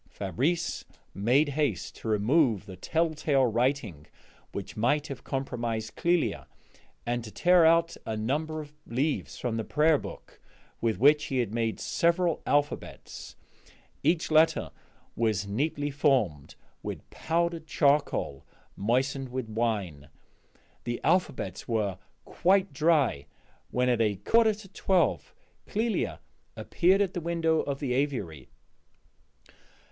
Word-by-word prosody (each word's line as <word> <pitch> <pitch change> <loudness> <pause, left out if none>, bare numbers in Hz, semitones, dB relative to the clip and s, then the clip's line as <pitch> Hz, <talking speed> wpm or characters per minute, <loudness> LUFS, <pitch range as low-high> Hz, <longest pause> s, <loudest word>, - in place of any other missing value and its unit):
Fabrice 140 - -1 0.3
made 125 +9 +2
haste 145 0 -1
to - - -8
remove 110 - +2
the 95 -3 -9
telltale 155 - +1
writing 120 - -1 0.4
which - - -6
might 145 +7 +1
have 135 -3 -7
compromised 120 -4 -3
Clélia, 170 -1 0 0.6
and 120 0 -1
to 110 - -8
tear 175 +6 +4
out 165 0 +3
a 110 -1 -4
number 155 +8 -2
of 150 -1 -12
leaves 135 +5 -1
from 120 -2 -2
the 110 - -1
prayer 150 +4 +3
book, - - -10 0.4
with 115 -2 +1
which 145 +3 +5
he 130 -3 0
made 115 +1 -2
several 170 -1 +1
alphabets; 145 0 -2 0.7
each 160 +2 +1
letter 155 +1 +3 0.4
was 110 -4 0
neatly 145 +7 -1
formed 125 - +1 0.3
with - - -6
powdered 165 0 -1
charcoal 140 - +1 0.3
moistened 130 +5 0
with 125 -2 -4
wine. 100 -10 -2 0.7
The 120 0 -3
alphabets 150 - 0
were 105 -5 -1 0.3
quite 190 -2 +2
dry 145 - +2 0.4
when 125 0 0
at 120 -2 +2
a 105 -2 +2
quarter 220 - +3
to 205 -1 -13
twelve 190 -1 0 0.3
Clélia 225 +2 -1 0.4
appeared 190 +3 +2
at 190 - -3
the 175 - -3
window 165 -1 +1
of 140 -1 -3
the 135 -4 -1
aviary. 120 - -2
135 Hz, 120 wpm, -28 LUFS, 110-160 Hz, 0.7 s, which